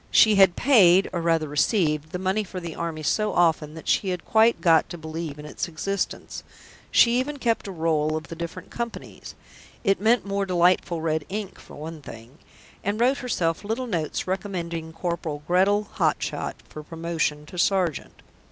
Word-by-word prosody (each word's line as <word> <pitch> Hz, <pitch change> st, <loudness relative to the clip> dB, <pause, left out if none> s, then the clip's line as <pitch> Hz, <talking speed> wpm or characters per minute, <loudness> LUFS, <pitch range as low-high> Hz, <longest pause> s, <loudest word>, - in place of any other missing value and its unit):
She 220 Hz, -, +6 dB
had 195 Hz, -3 st, +5 dB
paid, 195 Hz, -8 st, +5 dB
or 175 Hz, -, -1 dB
rather 165 Hz, -2 st, +1 dB
received, 150 Hz, -, +1 dB
the 180 Hz, -, -3 dB
money 190 Hz, +3 st, 0 dB
for 185 Hz, -1 st, -7 dB
the 170 Hz, -2 st, -6 dB
Army 165 Hz, -2 st, -4 dB
so 215 Hz, +7 st, +1 dB
often 160 Hz, -3 st, +2 dB
that 160 Hz, -, -10 dB
she 195 Hz, -, +2 dB
had 180 Hz, -2 st, -4 dB
quite 225 Hz, +1 st, +4 dB
got 165 Hz, -3 st, +4 dB
to 175 Hz, -, -7 dB
believe 160 Hz, -1 st, -6 dB
in 150 Hz, -, -9 dB
its 150 Hz, -, -4 dB
existence. 195 Hz, +4 st, -4 dB, 0.5 s
She 240 Hz, +1 st, +5 dB
even 285 Hz, +3 st, -3 dB
kept 230 Hz, -5 st, 0 dB
a -, -, -5 dB
roll 160 Hz, -3 st, 0 dB
of 155 Hz, -, -7 dB
the 165 Hz, -, -7 dB
different 170 Hz, 0 st, -7 dB
companies 235 Hz, -1 st, -7 dB, 0.5 s
(it 195 Hz, 0 st, +2 dB
meant 230 Hz, +2 st, +3 dB
more 200 Hz, 0 st, -1 dB
delightful 175 Hz, -2 st, +2 dB
red 160 Hz, -1 st, 0 dB
ink 205 Hz, -1 st, -5 dB
for -, -, -13 dB
one 155 Hz, +1 st, -8 dB
thing), 120 Hz, +2 st, -12 dB, 0.4 s
and 205 Hz, +2 st, -1 dB
wrote 255 Hz, +4 st, +3 dB
herself 175 Hz, -9 st, -1 dB
little 225 Hz, +5 st, -2 dB
notes 170 Hz, -10 st, -2 dB
recommending 175 Hz, -4 st, -4 dB
Corporal 165 Hz, -3 st, -4 dB
Gretal 195 Hz, +4 st, +3 dB
Hottshott -, -, -1 dB
for 155 Hz, -, -9 dB
promotion 160 Hz, -2 st, -3 dB
to 180 Hz, +3 st, -8 dB
sergeant. 180 Hz, -5 st, 0 dB
175 Hz, 175 wpm, -25 LUFS, 160-200 Hz, 0.5 s, She